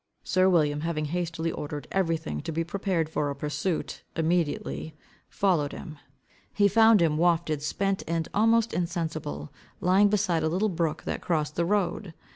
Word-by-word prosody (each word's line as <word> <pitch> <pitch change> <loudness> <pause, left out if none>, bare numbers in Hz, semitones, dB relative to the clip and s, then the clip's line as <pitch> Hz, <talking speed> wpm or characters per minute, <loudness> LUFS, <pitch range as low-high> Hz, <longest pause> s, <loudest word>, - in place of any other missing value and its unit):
Sir 185 0 +3
William, 150 -5 +2
having 155 -2 -2
hastily 165 0 -2
ordered 145 0 -6
everything 165 - -1
to - - -5
be 165 +1 -1
prepared 180 -2 -1
for 150 -2 -1
a 140 - -3
pursuit, 150 +4 -3
immediately 160 -1 -1 0.3
followed 170 -8 +1
him. 155 -6 -9 0.5
He 205 -1 +3
found 220 -2 +5
him, 155 -2 +2
wafted, 165 -3 +2
spent, 195 +5 -1
and 165 -1 -1
almost 225 +2 +3
insensible, 160 - -3 0.3
lying 190 +3 +4
beside 190 -5 +1
a 160 - +1
little 190 +6 +1
brook 165 -3 -1
that - - -3
crossed 150 -3 -1
the 170 - +1
road. 195 -2 -1
165 Hz, 155 wpm, -27 LUFS, 155-190 Hz, 0.5 s, found